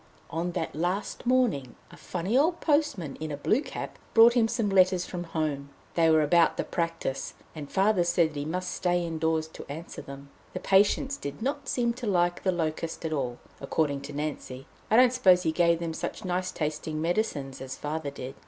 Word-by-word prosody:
On 175 Hz, +2 st, -2 dB
that 160 Hz, -, -3 dB
last 180 Hz, +8 st, -2 dB
morning 230 Hz, -, +1 dB, 0.2 s
a -, -, -12 dB
funny 185 Hz, +6 st, -3 dB
old 330 Hz, +6 st, +3 dB
postman 290 Hz, -, 0 dB
in 155 Hz, 0 st, -5 dB
a 145 Hz, -, -3 dB
blue 215 Hz, -, +2 dB
cap -, -, -7 dB, 0.2 s
brought 230 Hz, +1 st, +8 dB
him 235 Hz, -2 st, +3 dB
some 230 Hz, -2 st, -1 dB
letters 185 Hz, -2 st, +4 dB
from 175 Hz, -1 st, -5 dB
home. 150 Hz, -4 st, -2 dB, 0.2 s
They 165 Hz, -1 st, +4 dB
were 160 Hz, -1 st, +5 dB
about 165 Hz, +2 st, +4 dB
the -, -, 0 dB
practice, 165 Hz, -6 st, -3 dB, 0.2 s
and 150 Hz, -3 st, -8 dB
Father 195 Hz, -1 st, +3 dB
said 170 Hz, -1 st, +2 dB
that -, -, -14 dB
he 145 Hz, -, -2 dB
must 180 Hz, +3 st, -3 dB
stay 175 Hz, -1 st, 0 dB
indoors 160 Hz, -1 st, 0 dB
to -, -, -10 dB
answer 160 Hz, +4 st, -7 dB
them. 140 Hz, 0 st, -10 dB, 0.2 s
The -, -, -3 dB
patients 205 Hz, +8 st, +3 dB
did 140 Hz, -, -6 dB
not 280 Hz, 0 st, -2 dB
seem 235 Hz, -2 st, +1 dB
to 245 Hz, -1 st, -6 dB
like 175 Hz, -2 st, +1 dB
the 185 Hz, -, +1 dB
"locust" 165 Hz, -1 st, -3 dB
at 160 Hz, -, -1 dB
all, 125 Hz, -5 st, -2 dB, 0.2 s
according 140 Hz, 0 st, -1 dB
to 140 Hz, +1 st, -8 dB
Nancy. 140 Hz, -3 st, -5 dB, 0.2 s
I 220 Hz, -, +3 dB
don't 250 Hz, +1 st, +6 dB
suppose 185 Hz, -8 st, +5 dB
he 160 Hz, -, +1 dB
gave 170 Hz, +1 st, +3 dB
them 165 Hz, -1 st, -3 dB
such 195 Hz, -, -5 dB
nice 185 Hz, 0 st, -1 dB
tasting 155 Hz, 0 st, -3 dB
medicines 160 Hz, -6 st, -1 dB
as 130 Hz, -1 st, -6 dB
Father 150 Hz, 0 st, -3 dB
did. 135 Hz, -1 st, -7 dB
170 Hz, 200 wpm, -28 LUFS, 150-200 Hz, 0.2 s, brought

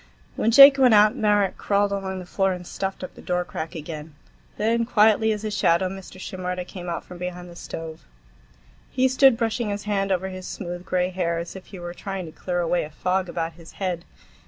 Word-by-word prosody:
When 225 Hz, -, +1 dB
Jake 275 Hz, +3 st, +9 dB
went 250 Hz, -4 st, +6 dB
out, 210 Hz, 0 st, +6 dB
Marek 205 Hz, -2 st, +2 dB
crawled 200 Hz, 0 st, +1 dB
along 195 Hz, -1 st, -3 dB
the 185 Hz, -, -7 dB
floor 195 Hz, +1 st, 0 dB
and 180 Hz, -1 st, -7 dB
stuffed 190 Hz, +1 st, -4 dB
up 185 Hz, -, -7 dB
the -, -, -13 dB
door 180 Hz, 0 st, -1 dB
crack 160 Hz, 0 st, -6 dB
again. 155 Hz, -1 st, -7 dB, 0.4 s
Then, 230 Hz, +2 st, +1 dB
quietly 220 Hz, -1 st, +4 dB
as 210 Hz, 0 st, -3 dB
a 215 Hz, -, -2 dB
shadow, 185 Hz, -3 st, +2 dB
Mr. 190 Hz, 0 st, -10 dB
Shimerda 180 Hz, -1 st, -4 dB
came 180 Hz, -1 st, -8 dB
out 170 Hz, -, -3 dB
from 180 Hz, -, -11 dB
behind 180 Hz, 0 st, -6 dB
the -, -, -12 dB
stove. 160 Hz, -2 st, -7 dB, 0.9 s
He 260 Hz, 0 st, +2 dB
stood 260 Hz, -1 st, +5 dB
brushing 225 Hz, -1 st, -1 dB
his 205 Hz, 0 st, -3 dB
hand 195 Hz, -2 st, -1 dB
over 190 Hz, 0 st, 0 dB
his 185 Hz, -1 st, -8 dB
smooth 175 Hz, -1 st, -6 dB
gray 180 Hz, 0 st, +1 dB
hair, 175 Hz, -2 st, -1 dB
as 170 Hz, +2 st, -6 dB
if 190 Hz, -, -10 dB
he 195 Hz, -, -10 dB
were 175 Hz, 0 st, -6 dB
trying 195 Hz, 0 st, -5 dB
to 160 Hz, -, -9 dB
clear 175 Hz, +2 st, -3 dB
away 175 Hz, +1 st, +1 dB
a 150 Hz, -, -7 dB
fog 185 Hz, +4 st, -1 dB
about 165 Hz, -1 st, -3 dB
his 165 Hz, 0 st, -14 dB
head. 180 Hz, -3 st, -3 dB
185 Hz, 215 wpm, -24 LUFS, 175-205 Hz, 0.9 s, Jake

